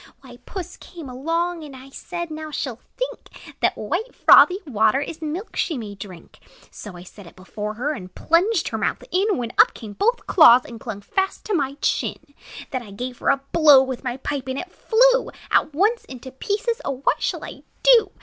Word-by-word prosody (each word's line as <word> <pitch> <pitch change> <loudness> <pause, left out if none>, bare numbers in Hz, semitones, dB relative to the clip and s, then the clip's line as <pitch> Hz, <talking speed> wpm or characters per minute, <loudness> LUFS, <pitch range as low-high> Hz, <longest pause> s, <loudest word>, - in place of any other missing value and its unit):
"Why, 245 -3 -13
Puss 370 -3 -7
came 335 -5 -11
along; 330 +6 -2
And, 270 -2 -12
said 345 -2 -6
I, - - -4
'Now 310 0 -6
she 295 - -3
'll 230 - -13 0.2
think - - -7
That - - +1
white, 475 +3 -3
frothy 365 - +7
water 220 -2 +2
Is 320 +3 -6
milk 320 +7 -5
she 320 - -1
may 215 -4 -6
drink.' 195 -3 -12 0.3
"So 200 -4 -10
I 175 - -10
set 190 +1 -14
it - - -15
before 210 +3 -6
her, 265 +7 -2
And 185 -11 -8
plunged 350 +3 +2
her - - -4
mouth - - -2
in, 390 +2 +1
When 235 -1 -4
up 470 +3 +6
came 215 -4 -9
both 470 - 0
paws, 255 -8 +7
And 230 -2 -10
clung 220 -3 -7
fast 385 - -2
to 430 - -2
my 280 -5 0
chin. 285 - -2 0.4
"Then 255 - -2
I 225 - -12
gave 245 +5 -6
her - - 0
a 275 -1 +2
blow 295 -5 +7
With 260 -1 -5
my 250 -1 -3
pipe; 270 0 -4
and 260 0 -3
it 360 +4 -6
flew - - +3 0.2
At - - +3
once 415 +10 +1
into 260 0 -10
pieces! 430 - -2
O 265 -1 -4
what - - +1
shall - - -2
I - - -10 0.2
do? - - +6
285 Hz, 205 wpm, -22 LUFS, 245-365 Hz, 0.4 s, frothy